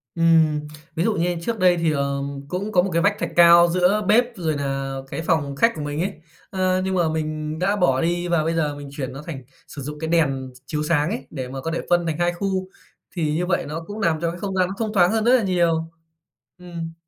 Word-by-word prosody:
Ừm, 165 -2 +4 0.4
ví 165 - 0
dụ 225 - +2
như 175 -2 0
trước 225 +5 -3
đây 180 -1 +4
thì, 165 -1 +1
ờ, 140 -1 -1 0.3
cũng 195 +6 -3
có 180 - +4
một 190 - -2
cái 170 - +2
vách - - +3
thạch 170 - -2
cao 170 0 +8
giữa 180 +4 +2
bếp 230 +4 +5
rồi 160 -5 -1
nà 135 -1 -3 0.2
cái 165 - -3
phòng 150 -5 0
khách 230 +10 +4
của 155 - -5
mình 145 +1 -3
ấy. 195 +3 -1 0.4
Ờ, 185 -1 +1
nhưng 190 - -1
mà 170 -3 +2
mình 155 0 -3
đã 195 +3 +1
bỏ 135 -10 +2
đi 175 +1 0
và 170 -2 +2
bây 165 +1 0
giờ 150 -3 0
mình 145 -1 -9
chuyển 135 -2 -5
nó 135 - -7
thành 140 -6 -7 0.2
sử 145 - -8
dụng 150 +2 -6
cái 160 - -3
đèn 135 -6 +1
ch - - -16
chiếu 150 +2 -2
sáng 150 0 +1
ấy, 225 +5 -5
để 130 -4 -5
mà 135 +1 -6
có 165 - -3
thể 165 - -2
phân 175 -1 +3
thành 160 -2 -2
2 175 0 +1
khu. 190 0 -2 0.5
Thì 155 -4 0
như 180 - 0
vậy 180 - 0
nó 160 +3 -5
cũng 210 +1 -6
làm 165 -6 +1
cho 170 -1 0
cái 175 - -9
không 195 0 -4
gian 185 -1 +2
nó 190 - -5
thông 220 -2 -2
thoáng 180 -3 +4
hơn 220 -1 +1
rất 245 +3 +5
là 240 - +2
nhiều. 170 -4 +1 0.7
Ừm. 170 -2 -7
170 Hz, 255 wpm, -22 LUFS, 150-185 Hz, 0.7 s, cao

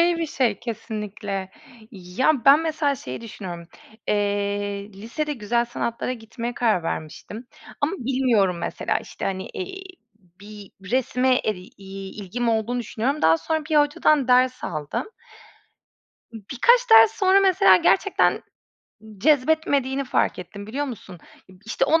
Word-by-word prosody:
iyi 345 0 +3
bir 330 - -1
şey 240 -8 0
kesinlikle. 210 -4 -5 0.4
Ya, 220 +8 -1
ben 280 +3 +7
mesela 310 -3 0
şeyi 130 - -7
düşünüyorum. 180 -7 -8 0.4
Eee, 205 0 -1
lisede 235 +10 -4
güzel 235 -1 0
sanatlara 235 +1 -3
gitmeye 230 +1 -6
karar 220 -7 +1
vermiştim 165 +9 -6 0.3
ama 285 +5 0
bilmiyorum 235 -8 +1
mesela - - -2
işte - - -8
hani, 190 -1 -3
eee, 380 +1 -7 0.6
bir 205 -1 -12 0.2
resme 255 0 +2
e 215 - +1
iii 195 +2 -10
ilgim 235 +5 -2
olduğunu 230 +2 0
düşünüyorum. 240 +6 -2
Daha 160 0 +5
sonra 315 - -2
bir 305 - +3
hocadan 295 -1 +3
ders 255 0 +3
aldım. 155 - -4 1.2
Imm, 225 - -9
birkaç 485 - +3
ders 450 -1 +8
sonra 390 -2 +3
mesela 365 - +5
gerçekten 400 - +3 0.7
n 215 -2 -15
cezbetmediğini 275 0 +2
fark - - 0
ettim, 200 +3 -9
biliyor 275 +7 -3
musun? 200 -8 -9 0.5
İşte 230 +4 0
o 320 +4 +3
235 Hz, 135 wpm, -23 LUFS, 200-285 Hz, 1.2 s, ders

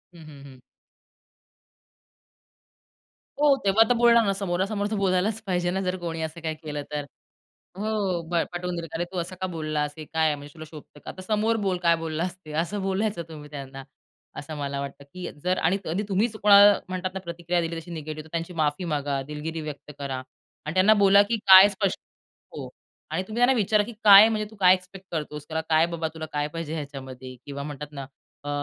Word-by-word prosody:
हं, 160 - -13
हं, 140 -2 -13
हं. 130 -2 -14 2.8
हो, 290 -1 +5
तेव्हा 200 +3 +6
तर - - +5
बोलणार 235 -1 +5
ना. 195 - +1
समोरासमोर 195 +2 -1
तर - - 0
बोलायलाच 195 +3 0
पाहिजे 175 -1 0
ना, 190 +1 -1
जर 185 0 -1
कोणी 165 -2 -5
असं 160 +1 -5
काही 160 -1 -3
केलं 150 -2 -6
तर. 145 -1 -3 0.7
हो, 210 - -3 0.5
प 170 - +3
पटवून 175 0 -3
देईल 165 -1 -4
का - - -3
"अरे 175 - -1
तू 180 - -4
असं 180 +2 -4
का 185 - -1
बोललास? 155 -3 -3
हे 155 - -6
काय 160 +1 0
आहे? 150 - +2
म्हणजे 145 0 -11
तुला 155 - -9
शोभतं 150 -1 -13
का? - - -8
आता 185 - -10
समोर 215 +3 +1
बोल 185 -2 0
काय 170 -1 +3
बोललास 165 +3 -3
ते," 155 - -9
असं 200 +4 -4
बोलायचं 195 -1 -1
तुम्ही 150 -2 -10
त्यांना. 135 -2 -8 0.6
असं 150 +1 -7
मला 140 -1 -3
वाटतं 140 0 -7
की 180 -1 -6
जर 185 0 +1
आणि 185 +4 +2
कधी 180 +6 -2
तुम्हीच 215 +3 0
कोणाला 205 0 +8
म्हणतात 185 0 -4
ना, 190 - -4
प्रतिक्रिया 175 0 -2
दिली 165 0 -3
तशी 175 +2 -13
निगेटिव्ह 155 -1 -6
तर - - -17
त्यांची 170 +1 -3
माफी 155 +2 0
मागा, 145 -3 -1
दिलगिरी 155 +2 -5
व्यक्त 150 -1 -8
करा 135 -2 -4 0.4
आणि 155 - -3
त्यांना 195 +4 +5
बोला 200 0 +6
की 230 - +1
काय 190 +1 +10
स्पष्ट 195 -1 -2 0.5
हो. - - -7 0.4
आणि 185 - -1
तुम्ही 220 +2 -5
त्यांना 250 +2 +5
विचारा 210 0 +3
की 235 - -7
"काय, 205 +1 +10
म्हणजे 215 -1 -1
तू 220 - -15
काय 185 0 +7
एक्सपेक्ट 185 +1 -10
करतोस," 150 -2 -5
"तुला 160 0 -2
काय 160 +1 +4
बाबा, 165 -1 -2
तुला 160 -1 -6
काय 145 0 -1
पाहिजे 165 -1 -5
ह्याच्यामध्ये." 130 -4 -7
किंवा 140 0 -6
म्हणतात 150 0 -7
ना, 140 -2 -6 0.4
अ, - - -6
170 Hz, 205 wpm, -25 LUFS, 150-195 Hz, 2.8 s, काय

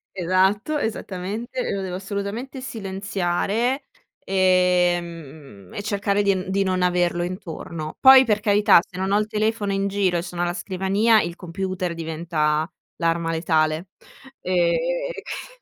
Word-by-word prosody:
Esatto, 190 - +1
esattamente, 220 +1 -4
lo 200 - -2
devo 185 -1 -4
assolutamente 200 +7 -5
silenziare, 205 +3 -2 0.4
ehm, 175 - 0
e - - -4
cercare 205 0 0
di 200 -1 +2
n 185 0 -4
di 195 +1 +1
non 185 -1 +1
averlo 175 -1 +1
intorno. 170 -4 -6
Poi 265 0 +9
per 215 -4 +1
carità 210 -3 +5
se 185 - -16
non 190 +1 -1
ho 200 - +4
il 210 - +1
telefono 215 -1 -1
in 195 0 0
giro 195 -3 +1
e - - -1
sono 175 0 -4
alla 175 0 -1
scrivania 195 +5 +2
il 170 - -5
computer 180 0 -4
diventa 160 -1 -1 0.3
l'arma 165 -1 0
letale. 160 0 0 0.5
Ehm, 180 -2 +2 0.5
e - - -7
q - - -8
185 Hz, 140 wpm, -23 LUFS, 175-205 Hz, 0.5 s, Poi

